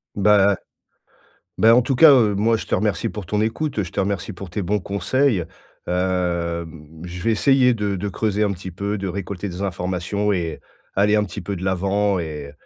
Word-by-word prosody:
Bah 100 Hz, 0 st, +4 dB
à -, -, -5 dB, 1.0 s
ben 115 Hz, +1 st, +6 dB
en 125 Hz, -, +6 dB
tout 135 Hz, +2 st, -1 dB
cas, 160 Hz, +2 st, +8 dB
heu, 115 Hz, -6 st, +4 dB
moi 115 Hz, +3 st, +2 dB
je -, -, -7 dB
te -, -, -1 dB
remercie 100 Hz, -3 st, 0 dB
pour 105 Hz, -, -7 dB
ton 105 Hz, +4 st, -1 dB
écoute, 115 Hz, +6 st, -2 dB
heu, -, -, +1 dB
je 90 Hz, -, -9 dB
te -, -, -8 dB
remercie 100 Hz, +1 st, -1 dB
pour 95 Hz, 0 st, -9 dB
tes 100 Hz, -, -3 dB
bons 100 Hz, +4 st, 0 dB
conseils. 100 Hz, +3 st, 0 dB, 0.4 s
Hem, 85 Hz, -3 st, -2 dB
je 90 Hz, 0 st, -7 dB
vais 115 Hz, -, +2 dB
essayer 130 Hz, +3 st, +4 dB
de 105 Hz, -3 st, -2 dB
de 100 Hz, +3 st, -3 dB
creuser 105 Hz, +1 st, -1 dB
un 100 Hz, -, 0 dB
petit 95 Hz, 0 st, -7 dB
peu, 100 Hz, +4 st, -3 dB
de 95 Hz, 0 st, -3 dB
récolter 100 Hz, +1 st, -5 dB
des 90 Hz, +1 st, -6 dB
informations 95 Hz, +2 st, -2 dB
et 85 Hz, -4 st, -3 dB, 0.3 s
aller 105 Hz, +2 st, +3 dB
un 105 Hz, -, +2 dB
petit 90 Hz, -3 st, -7 dB
peu 100 Hz, -, -4 dB
de 90 Hz, -, -6 dB
l'avant 100 Hz, +1 st, +1 dB
et 75 Hz, -3 st, -6 dB
100 Hz, 210 wpm, -21 LUFS, 90-105 Hz, 1.0 s, cas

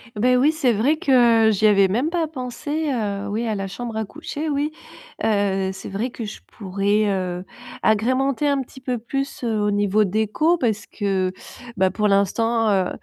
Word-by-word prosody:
Beh 250 Hz, +4 st, +3 dB
oui, 280 Hz, +5 st, +4 dB
c'est 295 Hz, -7 st, +1 dB
vrai 260 Hz, +9 st, +2 dB
que 240 Hz, -6 st, +4 dB
j'y 215 Hz, +1 st, +1 dB
avais 200 Hz, -2 st, +5 dB
même 245 Hz, -, 0 dB
pas 340 Hz, -2 st, 0 dB
pensé, 290 Hz, +2 st, -3 dB
heu, 205 Hz, -4 st, -2 dB
oui, 225 Hz, +3 st, -2 dB
à 220 Hz, -, -1 dB
la 195 Hz, -1 st, -3 dB
chambre 230 Hz, +3 st, -6 dB
à 220 Hz, -, -1 dB
coucher, 295 Hz, +9 st, -6 dB
oui, 295 Hz, 0 st, -1 dB, 0.5 s
heu 195 Hz, -3 st, +1 dB
c'est 190 Hz, -, -8 dB
vrai 215 Hz, +6 st, -3 dB
que 235 Hz, -, -7 dB
je 215 Hz, -1 st, -7 dB
pourrais, 200 Hz, +1 st, 0 dB
heu, 185 Hz, -2 st, -2 dB, 0.4 s
agrémenter 260 Hz, +6 st, +1 dB
un 280 Hz, -1 st, +1 dB
petit 265 Hz, +1 st, -11 dB
peu 250 Hz, -2 st, -3 dB
plus, 275 Hz, +4 st, -4 dB
heu, 225 Hz, -3 st, 0 dB
au 210 Hz, 0 st, +1 dB
niveau 205 Hz, +1 st, +2 dB
déco 220 Hz, -, +1 dB
parce 220 Hz, -7 st, 0 dB
que 195 Hz, -3 st, -1 dB, 0.5 s
bah, 190 Hz, 0 st, +3 dB
pour 210 Hz, +3 st, 0 dB
l'instant, 225 Hz, +3 st, +2 dB
heu, 190 Hz, -3 st, +2 dB
220 Hz, 185 wpm, -22 LUFS, 200-260 Hz, 0.5 s, avais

